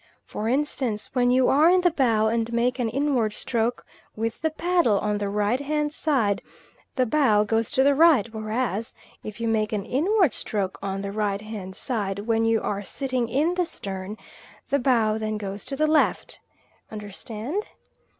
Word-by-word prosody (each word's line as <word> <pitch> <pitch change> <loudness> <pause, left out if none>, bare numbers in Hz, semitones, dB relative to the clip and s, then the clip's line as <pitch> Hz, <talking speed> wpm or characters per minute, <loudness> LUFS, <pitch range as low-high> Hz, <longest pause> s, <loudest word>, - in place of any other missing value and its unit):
For 220 +2 -3
instance, 260 -5 -1
when 245 -2 +2
you 255 0 +4
are 305 +4 +5
in 365 0 +4
the 355 -1 +3
bow, 230 -8 +2
and 230 +1 0
make 245 +2 0
an 235 -2 0
inward 255 -4 0
stroke 235 +1 -2 0.3
with 225 +1 -3
the 320 - +1
paddle 335 - +2
on 210 0 -1
the 205 -1 -2
right 210 +4 +1
hand 300 +1 -1
side, 255 -12 +1 0.5
the 255 - +2
bow 225 -6 +3
goes 225 +1 0
to 265 - +2
the 280 +1 +5
right; 295 -7 +5
whereas, 220 0 -2 0.3
if 215 +1 -8
you 230 - -1
make 215 -1 +1
an 205 -2 -2
inward 350 - +2
stroke 195 -3 -3
on 195 0 -3
the 200 0 -4
right 205 -1 -1
hand 200 -4 -7
side, 205 -7 -2
when 225 +2 0
you 225 -1 +2
are 200 -1 -2
sitting 255 +1 -2
in 300 +8 +1
the 360 0 0
stern, 195 -2 -6 0.5
the 280 - +2
bow 225 -4 +2
then 215 -1 -2
goes 200 -1 -6
to 275 - -4
the 305 +3 +2
left. 310 0 +1 0.5
Understand? 220 - -5
230 Hz, 180 wpm, -25 LUFS, 210-275 Hz, 0.5 s, are